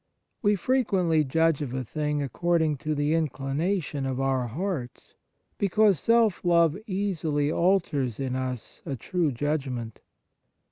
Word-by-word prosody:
We 205 -1 +3
frequently 190 -8 +2
judge 160 +2 +2
of 130 -3 -4
a 130 - -2
thing 150 +3 -2
according 160 +1 +1
to 155 +3 -2
the 145 +1 +1
inclination 150 0 -1
of 130 -1 -2
our 135 -2 0
hearts, 145 - -5 0.5
because 200 -2 +3
self 230 -2 +3
love 170 -3 +4
easily 165 -7 -1
alters 165 - +1
in 130 -2 -2
us 130 -2 -5
a 140 -5 -4
true 165 +5 -1
judgment." 130 -4 -3
155 Hz, 130 wpm, -26 LUFS, 135-180 Hz, 0.5 s, love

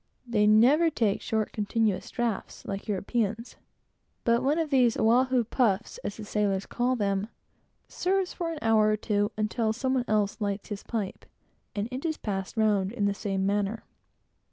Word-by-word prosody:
They 215 -3 +2
never 260 +10 +5
take 225 -9 0
short, 220 -1 -1
continuous 210 -2 0
draughts, 235 -4 -3
like 195 0 -5
Europeans, 215 +3 -2 0.7
but 235 0 +3
one 285 +4 +1
of 320 -3 -1
these 250 -4 +4
"Oahu 250 +2 +3
puffs," 225 -2 0
as 205 - -5
the 215 - -7
sailors 200 -2 0
call 250 +1 0
them, 200 -2 0 0.6
serves 375 0 0
for 335 -2 -3
an 325 - -5
hour 220 -1 +4
or 215 - +2
two, 205 -1 0
until 220 +1 0
some 260 +3 -1
one 255 -2 +1
else 210 0 0
lights 200 -1 -2
his 205 -2 -5
pipe, 215 -5 -4 0.5
and 205 +1 -1
it 255 +2 -5
is 315 -2 -1
passed 195 +1 -4
round 205 -3 +2
in 220 -4 -1
the 200 - +2
same 195 -1 -2
manner. 205 +2 -1
215 Hz, 170 wpm, -28 LUFS, 205-245 Hz, 0.7 s, never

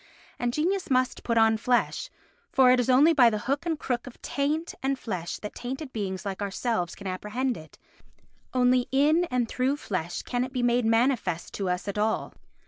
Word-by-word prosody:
And 240 0 0
genius 355 +8 -1
must 255 -1 +1
put 230 -1 0
on 225 0 +5
flesh, 250 - 0 0.4
for 260 -2 +6
it 255 - +4
is 245 - 0
only 285 +6 +6
by 250 -6 +6
the 215 - -1
hook 280 +6 -1
and 325 -2 0
crook 245 -3 -3
of 255 - -11
taint 300 +4 -1
and 270 0 0
flesh 180 -9 -4
that 210 - -6
tainted 260 +3 -6
beings 195 -3 -4
like 195 0 -4
ourselves 200 -2 -2
can 200 - -12
apprehend 210 +7 -2
it, 160 -3 -12 0.7
only 250 0 +3
in 300 +6 +4
and 250 -6 0
through 260 +5 0
flesh 180 - -4
can 245 0 -1
it 255 +1 -6
be 250 -2 -1
made 240 0 +2
manifest 225 -7 +1
to 195 -2 -2
us 180 +2 -2
at 200 +1 -2
all. 220 +1 0
245 Hz, 195 wpm, -27 LUFS, 210-265 Hz, 0.7 s, for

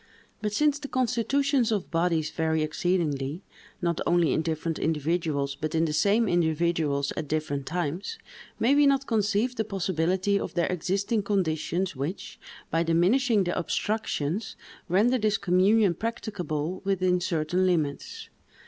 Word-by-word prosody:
But 210 - -1
since 295 +6 +2
the 285 - -6
constitutions 255 +1 +1
of 210 -3 -2
bodies 165 -2 +1
vary 160 -1 0
exceedingly, 155 -1 -1 0.4
not 170 -1 0
only 175 -2 +3
in - - +1
different 160 0 -2
individuals, 155 -2 -1
but 155 +3 -4
in 165 +1 +3
the 155 - -2
same 205 +8 +3
individuals 160 -4 +1
at 155 - -4
different 145 -2 -2
times, 175 - -3 0.4
may 245 +5 +3
we 290 0 +5
not 275 -1 +2
conceive 220 +2 0
the 220 - 0
possibility 190 0 0
of - - -5
there 175 +1 +1
existing 195 +5 0
conditions 185 -2 -1
which, 145 +9 -5 0.3
by 165 - +2
diminishing 195 +7 +3
the 175 - -2
obstructions, 195 -1 -2 0.3
render 225 +8 +3
this 215 -1 +1
communion 195 +1 +3
practicable 185 -6 -4
within 185 -2 +1
certain 180 +1 0
limits? 155 -6 -2
180 Hz, 140 wpm, -27 LUFS, 160-210 Hz, 0.4 s, we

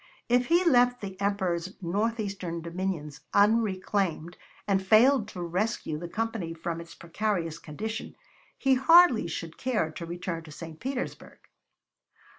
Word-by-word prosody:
If 245 +1 +3
he 345 +2 +4
left 245 -5 +4
the 195 -2 -6
Emperor's 190 -2 -1
northeastern 195 -3 -2
dominions 170 -4 -4
unreclaimed 195 -5 +1 0.3
and 195 -1 +2
failed 225 +4 +5
to 180 -5 -6
rescue 175 -2 -2
the 175 - -6
Company 210 -4 -3
from 165 0 -4
its 170 0 -12
precarious 170 -2 -2
condition, 220 +9 -6 0.4
he 270 0 +3
hardly 320 - +6
should 165 0 -6
care 215 -11 0
to 170 +2 -7
return 175 -1 -4
to 155 - -11
St. 160 +1 -9
Petersburg. 260 0 -5
195 Hz, 130 wpm, -28 LUFS, 170-225 Hz, 0.4 s, hardly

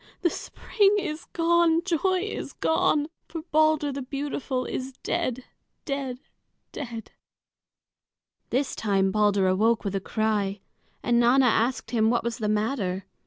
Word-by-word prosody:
The 345 - +3
spring 410 -1 +1
is 325 -5 -3
gone! 335 0 +2
Joy 370 +1 +1
is 420 - -5
gone! 305 -2 +2 0.2
For 325 -2 -6
Balder 310 -1 +3
the 275 0 -4
beautiful 270 -1 -3
is 260 +1 -4
dead, 255 0 -1 0.4
dead, 275 -4 -3 0.5
dead!" 235 -4 -7 1.4
This 265 +2 0
time 195 -3 +1
Balder 205 -1 +3
awoke 220 +5 +2
with 200 -2 -2
a 195 - 0
cry, 205 -2 -1 0.4
and 240 -1 +3
Nanna 250 +3 +5
asked 240 +2 +1
him 220 -2 +3
what 240 0 +1
was 235 +1 -3
the 210 -2 -1
matter. 210 -4 -1
255 Hz, 135 wpm, -26 LUFS, 215-310 Hz, 1.4 s, Nanna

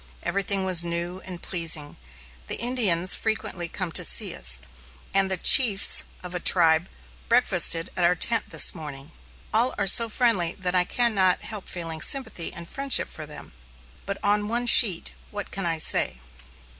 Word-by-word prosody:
Everything 195 0 -3
was 180 -3 +4
new 170 +2 -6
and 180 -2 -9
pleasing; 165 -4 -2 0.5
the - - -1
Indians 205 -8 0
frequently 190 -5 -4
come 180 0 -7
to - - -1
see - - +2
us, 65 0 -3 0.5
and 195 0 +1
the 190 - -3
chiefs 205 +1 +5 0.2
of 180 0 -10
a 180 - -4
tribe 165 -1 +1 0.4
breakfasted 185 -8 +2
at 180 - 0
our 175 +1 +2
tent 230 +7 -1
this - - +4
morning. 150 -3 -11 0.4
All 235 +4 -1
are 200 - -2
so 230 +4 +5
friendly 210 -8 -1
that 185 -2 -5
I 180 -1 +1
can 235 +4 +3
not 185 -3 0
help 210 -4 -8
feeling 165 -3 -7
sympathy 260 - -1
and 170 0 -11
friendship 275 +5 -1
for 155 -2 -10
them. 150 - -13 0.5
But 200 0 -5
on 205 0 -1
one 240 +2 -4
sheet 205 -7 +6 0.2
what 205 0 -9
can 195 -3 -4
I 165 -1 -2
say? 155 - 0
185 Hz, 170 wpm, -23 LUFS, 170-210 Hz, 0.5 s, sheet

